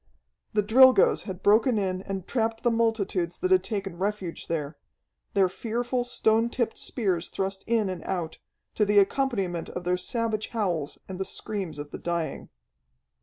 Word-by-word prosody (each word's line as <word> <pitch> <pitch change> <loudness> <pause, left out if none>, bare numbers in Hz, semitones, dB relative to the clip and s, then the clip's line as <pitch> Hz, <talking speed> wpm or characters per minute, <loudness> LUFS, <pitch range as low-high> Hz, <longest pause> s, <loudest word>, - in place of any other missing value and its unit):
The 210 -1 +2
Drilgoes 255 +5 +6
had 190 -2 -7
broken 220 +3 +4
in 185 -2 -1
and 195 -2 -5
trapped 225 -2 -1
the 240 - +3
multitudes 210 -6 0
that 370 - -1
had 370 - +5
taken 195 -5 -4
refuge 195 -3 -3
there. 155 -2 -3 0.6
Their 195 -2 +5
fearful 240 +5 -2
stone 225 -1 +2
tipped 235 -2 -1
spears 185 -8 -2
thrust 195 0 -3
in 225 -3 +2
and 185 -3 -5
out, 175 -4 -3 0.3
to 215 - +2
the 205 0 +2
accompaniment 195 -5 +1
of 180 - -6
their 180 +1 +1
savage 220 +2 -1
howls 175 -10 -2
and 190 -1 -7
the - - 0
screams 190 -5 -4
of 145 0 -7
the - - -6
dying. 170 -2 -3
200 Hz, 165 wpm, -27 LUFS, 180-230 Hz, 0.6 s, Drilgoes